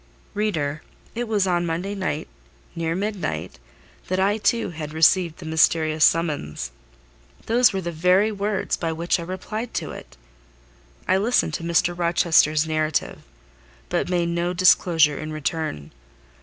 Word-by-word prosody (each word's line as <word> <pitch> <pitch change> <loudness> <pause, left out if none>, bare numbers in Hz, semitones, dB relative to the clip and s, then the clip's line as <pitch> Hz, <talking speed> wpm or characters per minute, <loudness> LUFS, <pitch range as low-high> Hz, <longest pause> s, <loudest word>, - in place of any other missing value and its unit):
Reader, 160 -8 -1 0.3
it 240 +1 -3
was 210 -3 +1
on 175 -2 +1
Monday 175 +4 -3
night—near 165 -1 -5
midnight—that 135 - -5
I 200 +3 +2
too 220 -1 +1
had 155 -2 -7
received 165 +1 +3
the 175 - -10
mysterious 160 -1 +2
summons: 145 - +1 0.7
those 240 +1 +4
were 195 - -3
the 170 -1 -4
very 180 +6 +3
words 200 -1 -1
by 165 -1 -3
which 170 +2 0
I - - -4
replied 210 +6 -5
to - - -3
it. - - -11 0.9
I 185 - +3
listened 210 -5 +1
to 165 - -4
Mr. 170 +1 +1
Rochester's 170 -3 +3
narrative, 155 -1 -1 0.7
but - - -1
made 175 -2 0
no 170 +1 -1
disclosure 170 -4 +4
in 155 0 -5
return. 155 - -3
170 Hz, 135 wpm, -23 LUFS, 155-190 Hz, 0.9 s, those